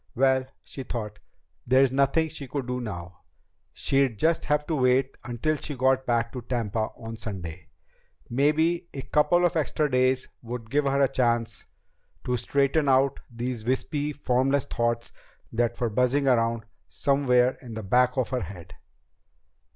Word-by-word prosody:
Well, 130 0 +3 0.2
she 135 - -8
thought, 105 -5 -5 0.5
there's 130 +1 +5
nothing 140 +4 +2
she 150 -3 -8
could 135 +1 -3
do 125 0 -3
now. 90 -6 -7 0.5
She'd 135 -5 +1
just 165 +7 +1
have 150 0 +1
to 165 - -2
wait 130 0 +2
until 120 +6 -1
she 145 0 -6
got 130 0 +2
back 115 -1 +1
to 125 - -5
Tampa 115 -3 -2
on 115 -1 -7
Sunday. 95 -7 -7 0.6
Maybe 160 +7 +1
a 135 - -4
couple 175 +4 +3
of 175 - +1
extra 150 -1 0
days 130 +1 +2
would 115 -1 -7
give 145 +1 +2
her 140 0 +2
a - - +5
chance 120 -3 0 0.6
to 125 - 0
straighten 140 +4 +1
out 135 +1 +3
these 120 -1 -4
wispy, 145 +4 -1
formless 135 0 +1
thoughts 120 0 -1 0.4
that 120 0 0
were 120 -3 0
buzzing 125 +5 +2
around 115 -2 +2 0.2
somewhere 130 -3 +2
in 120 -3 -9
the 110 - -5
back 125 +6 +2
of 130 - +1
her 130 -2 -1
head. 90 -4 -9
130 Hz, 155 wpm, -26 LUFS, 115-140 Hz, 0.6 s, there's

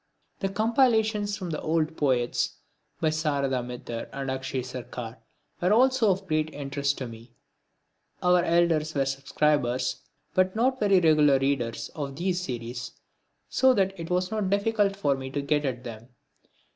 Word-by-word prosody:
The 195 - -1
compilations 220 -1 +2
from 180 -5 -5
the 155 - -3
old 160 0 0
poets 125 -5 0 0.4
by 160 - +2
Sarada 140 -4 0
Mitter 120 -1 -6
and 135 -1 -4
Akshay 130 -1 -3
Sarkar 125 -2 -7 0.4
were 180 +2 +2
also 255 0 +4
of 190 +1 0
great 155 -3 0
interest 140 0 -2
to 130 - -4
me. 115 +1 -12 0.9
Our 180 0 +5
elders 165 -2 +2
were 135 -1 +2
subscribers, 135 -1 0 0.4
but 185 +1 +2
not 255 +3 +1
very 200 -3 +4
regular 150 -4 +5
readers, 135 -4 -1
of 140 -3 -5
these 180 +3 -1
series, 120 -4 -5 0.5
so 260 -1 +4
that 195 -2 +2
it 165 - -6
was 180 +1 0
not 210 -3 -1
difficult 200 0 +1
for 145 -8 +1
me 130 0 -6
to 145 +1 -2
get 150 +1 +1
at 125 -2 -3
them. 115 0 -9
155 Hz, 155 wpm, -27 LUFS, 135-190 Hz, 0.9 s, Our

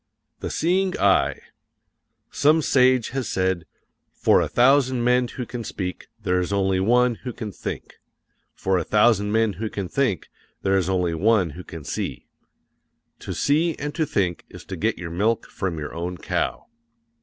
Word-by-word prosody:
The - - -4
Seeing 185 +3 +1
Eye 100 -1 +3 0.9
Some 155 +2 +3
sage 130 -3 +3
has 130 -4 -3
said: 95 -2 0 0.4
"For - - +3
a - - 0
thousand 130 -1 +3
men 125 +1 +3
who 125 +1 -6
can 120 0 -6
speak, 90 -4 -5
there 90 -4 +1
is 90 +1 -2
only 95 -1 +1
one 120 +4 +3
who 125 - -4
can 110 -3 -6
think; - - -7 0.6
for 95 -1 +1
a - - -2
thousand 105 +1 +3
men 110 -1 +2
who 110 - -1
can 100 -3 -4
think, 125 -5 -1 0.3
there 95 0 +2
is 95 -1 +1
only 90 -3 +1
one 95 0 +2
who 90 +5 -9
can 80 -3 -9
see." - - -4 0.9
To - - -7
see 160 +3 +2
and 145 +1 -5
to 160 -1 -1
think 90 -7 -1
is - - -12
to - - -6
get - - 0
your 85 -2 -6
milk 105 +6 0
from 95 -4 -4
your 75 -1 -5
own 90 +2 -4
cow. - - -2
105 Hz, 170 wpm, -23 LUFS, 90-125 Hz, 0.9 s, Eye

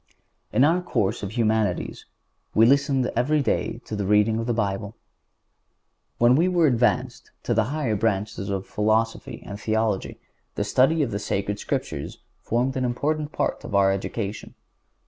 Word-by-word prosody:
In 125 - +3
our 165 +5 +3
course 105 - -1
of 100 +1 -5
Humanities 110 -2 0 0.5
we 110 - +6
listened 140 0 +3
every 140 +5 +2
day 120 - -1
to 110 - -5
the 100 -2 -2
reading 105 +2 +3
of 115 - -3
the - - +1
Bible. 100 -1 -2 1.2
When 120 +1 +5
we 165 +5 +3
were 175 -3 +3
advanced 125 -1 +1
to 120 - 0
the 110 -1 +2
higher 135 -4 -1
branches 105 -2 -1
of 95 -1 -2
Philosophy 110 +2 -1
and 100 0 -7
Theology 110 -2 -1 0.4
the - - 0
study 135 +9 +3
of 125 - -3
the 100 - -2
Sacred 100 0 -2
Scriptures 70 - -4 0.2
formed 125 +3 0
an 130 - -1
important 150 +5 -1
part - - -2
of - - -4
our 100 -1 +5
education. 100 +2 -4
115 Hz, 160 wpm, -24 LUFS, 105-130 Hz, 1.2 s, we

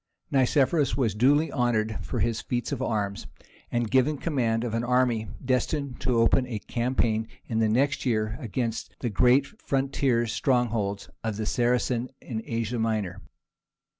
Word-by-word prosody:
Nicephorus 140 +2 +2
was 120 -7 +1
duly 140 +9 +3
honoured 110 -4 0
for - - -3
his 115 -1 0
feat 120 +2 -3
of 135 -3 -2
arms, 105 -5 -2 0.4
and 120 -2 -1
given 135 +3 +3
command 120 -7 0
of 120 -3 -3
an 115 +1 0
army 120 -3 +2 0.2
destined 130 +2 -1
to 125 -2 +1
open 125 +3 +3
a 115 -4 -3
campaign 115 -1 0 0.2
in 110 -2 -1
the 110 -1 +3
next 140 +5 +1
year 110 -3 0
against 115 -2 -3
the 120 - -1
great 125 +6 +4
frontier 135 - 0
strongholds 115 -5 0 0.2
of 110 -2 -2
the 110 - -2
Saracens 120 +1 +1
in 110 -3 -5
Asia 115 +1 -2
Minor. 110 -4 -1
120 Hz, 150 wpm, -27 LUFS, 110-130 Hz, 0.4 s, great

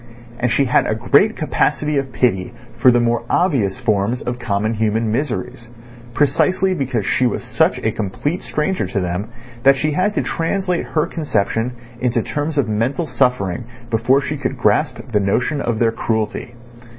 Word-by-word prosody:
And 125 - +1
she 140 - +3
had 125 - +2
a 110 - 0
great 145 - +3
capacity 150 -1 0
of 135 -1 -5
pity 95 -8 0 0.3
for 130 - +6
the 120 -1 +4
more 120 0 +1
obvious 125 - +1
forms 110 +3 0
of 120 0 -3
common 110 -1 -1
human 110 0 0
miseries, 120 -2 -3 0.5
precisely 185 +6 +2
because 130 - -2
she 125 - +2
was 115 - -3
such - - +1
a 110 - -1
complete 110 - -3
stranger 170 +5 -1
to 110 - -2
them 90 +3 -2 0.3
that 135 +2 +6
she 150 +3 0
had 185 +7 0
to - - +1
translate 180 +1 -1
her 155 -1 +1
conception 125 - -1 0.3
into 120 -2 0
terms 150 +1 -3
of 140 -5 +2
mental 115 +10 0
suffering 125 - 0 0.3
before 120 +5 +3
she 150 +2 -3
could 135 -1 -3
grasp 120 +5 +2
the 105 - +3
notion 125 +9 0
of 115 -2 -1
their 115 0 +2
cruelty. 110 +1 -2
125 Hz, 170 wpm, -19 LUFS, 110-150 Hz, 0.5 s, for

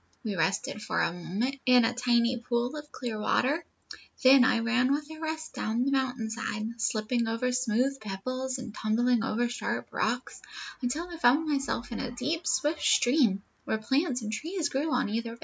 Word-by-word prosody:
"We 215 -4 -2
rested 190 +5 -1
for - - -1
a 170 - +1
moment 205 +10 -2
in 250 -2 +6
a - - +1
tiny 240 0 +2
pool 240 +3 -1
of 300 0 -8
clear 235 -4 -4
water; 280 +9 +1 0.6
then 260 0 +8
I 250 - +4
ran 250 +3 +2
with 290 +1 0
the 315 0 -10
rest 315 0 -4
down 230 +3 -1
the 275 - +1
mountain 255 -4 -1
side, 220 0 -4
slipping 230 +1 0
over 230 +3 0
smooth 255 +2 +1
pebbles, 255 +6 -4
and 250 -4 -7
tumbling 230 +2 +1
over 235 +2 0
sharp 240 - -3
rocks, - - -2 0.4
until 290 +8 -2
I 345 -1 -8
found 295 +2 +4
myself 275 -4 -1
in 230 - -4
a 260 - -3
deep, 300 +8 -3
swift 305 +2 +1
stream, 240 -7 +3 0.2
where 220 - 0
plants 265 +3 0
and 215 0 -3
trees 330 - -2
grew 295 +4 -1
on 250 - +1
either 230 +2 -3
bank." - - -21
245 Hz, 185 wpm, -29 LUFS, 225-275 Hz, 0.6 s, then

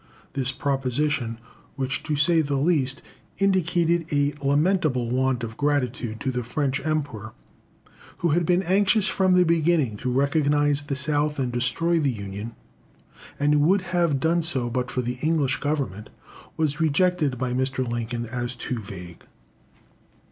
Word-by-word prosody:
This 135 -1 +1
proposition 135 -2 -1 0.4
which, 135 0 -2
to 155 - -1
say 160 +3 +4
the 145 -2 -2
least, 140 -2 +1 0.3
indicated 175 -3 +1
a 145 0 +1
lamentable 145 -4 +1
want 130 -1 +1
of 115 0 -6
gratitude 125 -6 -1
to 130 - -1
the 125 -1 -2
French 135 +3 -2
Emperor, 140 -9 -3 0.8
who 170 - 0
had 170 +3 +2
been 180 +3 +2
anxious 200 +3 +3
from 190 -1 +2
the 180 - +6
beginning 165 -8 +2
to 125 +4 -3
recognise 145 +1 +2
the 145 -1 -4
South 150 +1 0
and 130 -3 -1
destroy 125 +8 +1
the 145 -3 +1
Union, 105 0 -6 0.8
and 145 +1 +3
who 150 - +4
would 185 +7 +3
have 170 -6 +2
done 165 +4 +2
so 130 -8 +1
but 125 0 -2
for 125 - -2
the 125 +1 -4
English 155 -4 +1
Government 135 -9 -3 0.5
was 155 -1 0
rejected 160 -3 +2
by 125 0 -2
Mr. 130 0 -1
Lincoln 120 0 -3
as 120 +1 -4
too 125 0 -4
vague. 90 -4 -10
140 Hz, 150 wpm, -24 LUFS, 125-160 Hz, 0.8 s, the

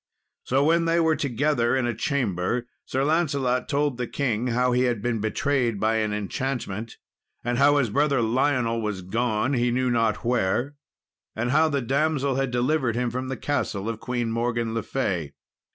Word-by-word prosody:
So 135 +2 +2
when 165 +2 +3
they 165 +1 +2
were 160 -1 +3
together 140 -3 +1
in 130 - 0
a 120 - 0
chamber, 120 - -1 0.2
Sir 135 +1 -1
Lancelot 140 -5 +1
told 145 -3 0
the 125 - -1
king 125 -4 -1
how 125 +1 +1
he 125 +1 +2
had 120 -3 0
been 115 +1 -1
betrayed 120 0 0
by 110 +2 +2
an 110 -1 0
enchantment, 110 0 -3 0.5
and 120 +1 -1
how 145 +1 +5
his 125 -7 +1
brother 140 +2 +2
Lionel 120 0 +1
was 105 -4 -3
gone 115 +5 0
he 120 -1 +2
knew 125 +1 +1
not 115 -2 0
where, 120 +3 +1 0.6
and 120 +3 -1
how 155 +3 +4
the 140 -2 0
damsel 140 +1 +1
had 135 0 0
delivered 125 0 +1
him 120 0 0
from 130 +2 -3
the 130 0 -4
castle 110 -8 -2
of 115 -1 -3
Queen 120 -2 -2
Morgan 115 0 -1
le 115 - -1
Fay. 90 - -2
125 Hz, 180 wpm, -25 LUFS, 115-140 Hz, 0.6 s, how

